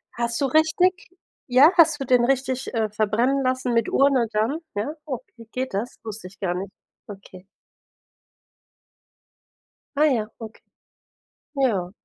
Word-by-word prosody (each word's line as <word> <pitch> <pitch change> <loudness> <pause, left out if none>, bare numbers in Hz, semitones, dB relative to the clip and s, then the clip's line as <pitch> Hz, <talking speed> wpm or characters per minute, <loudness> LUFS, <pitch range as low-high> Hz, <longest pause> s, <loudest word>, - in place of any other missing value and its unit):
Hast 235 0 -2
du - - +3
richtig 320 +6 +2 0.4
ja, 270 +6 +6
hast 315 -3 +5
du 270 - -3
den 245 -1 +3
richtig, 260 0 -1
äh, 220 -2 0
verbrennen 225 +6 0
lassen 255 -1 -1
mit 230 -1 +1
Urne 270 -4 +3
dann, 225 +9 0 0.2
ja? 210 +9 -2
Okay, 250 -4 -8
geht 260 -3 -4
das? 220 +5 -4
Wusste 215 -3 -7
ich 195 - -18
gar 180 -3 -1
nicht. 195 +1 -5 0.4
Okay. 195 -2 -12 2.5
Ah 300 +2 +4
ja, 230 -7 0
okay. 225 -1 -10 1.0
Ja. 205 -10 0
245 Hz, 135 wpm, -23 LUFS, 215-275 Hz, 2.5 s, ja